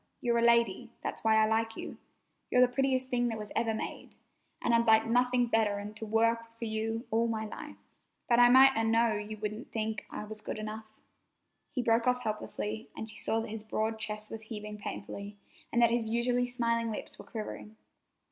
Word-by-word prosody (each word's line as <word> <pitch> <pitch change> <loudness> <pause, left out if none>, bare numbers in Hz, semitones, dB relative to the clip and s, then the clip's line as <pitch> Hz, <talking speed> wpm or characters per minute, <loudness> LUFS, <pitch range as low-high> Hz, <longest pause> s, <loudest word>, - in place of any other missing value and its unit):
You're 235 -1 +1
a - - +2
lady. 235 -1 +3
That's - - -4
why 220 0 +4
I 220 0 +5
like 225 +1 0
you. - - -6 0.5
You're 250 - +4
the 245 - -6
prettiest 260 -1 +1
thing 245 -1 +2
that 225 -2 -2
was 210 -1 -7
ever 225 0 +1
made, - - -6 0.4
an' 235 - +1
I'd 230 0 +3
like 220 0 +6
nothing 245 +1 +3
better'n 210 -3 0
to 215 +1 -6
work 230 +2 +3
hard 230 0 -17
for 230 - -4
you 225 +2 -2
all 230 +1 +2
my 220 -1 -2
life. 215 - -8 0.5
But 240 -1 +4
I 245 0 +8
might 265 +2 +8
'a' 225 - +2
known 225 -2 +2
you 215 - -5
wouldn't 215 +3 -5
think 220 -2 -3
I - - -5
was 215 0 -8
good 215 - -5
enough." 215 0 -6 0.8
He 260 -4 -2
broke 230 0 +3
off 250 0 +2
helplessly, 215 0 -4
and 220 - -5
she 215 -1 -8
saw 225 - 0
that 225 - -6
his 215 0 -5
broad 220 +1 -2
chest 215 0 -5
was 225 - -6
heaving 210 -1 -7
painfully 200 0 -6 0.3
and 235 - +3
that 235 - +5
his 230 -2 0
usually 245 +2 +1
smiling 230 -2 0
lips 215 - -6
were - - -10
quivering. 215 -1 -7
225 Hz, 205 wpm, -31 LUFS, 215-235 Hz, 0.8 s, I